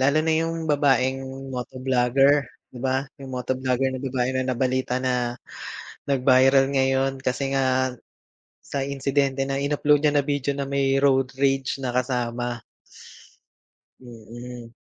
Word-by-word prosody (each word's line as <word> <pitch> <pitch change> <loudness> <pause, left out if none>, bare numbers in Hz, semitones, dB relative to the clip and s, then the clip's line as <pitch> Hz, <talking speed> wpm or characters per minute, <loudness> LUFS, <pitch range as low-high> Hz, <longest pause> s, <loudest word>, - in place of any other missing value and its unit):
lalo 140 +3 +3
na 160 - +1
yung 165 -1 -2
babaeng 135 -2 +2 0.3
motoblogger, 130 +2 +2 0.2
'di 125 - -11
ba? 130 +1 0 0.2
Yung 135 -1 -9
motoblogger 130 +1 0
na 130 - -4
babae 125 -1 0
na 130 - +1
nabalita 130 0 0
na, 125 -2 0 0.7
nag-viral 135 0 +4
ngayon 135 0 +1
kasi 135 +1 -1
nga 130 -1 +1 0.7
sa 140 - -5
insidente 140 0 0
na 135 0 -1
in-upload 145 +1 +2
niya 150 - +3
na 145 - +4
video 140 -1 -1
na 140 -1 -3
may 135 0 +1
road 135 -2 +2
rage 135 0 0
na 130 - -1
kasama. 120 -1 -2 1.4
Mm. 120 0 -10
135 Hz, 130 wpm, -24 LUFS, 125-140 Hz, 1.4 s, nag-viral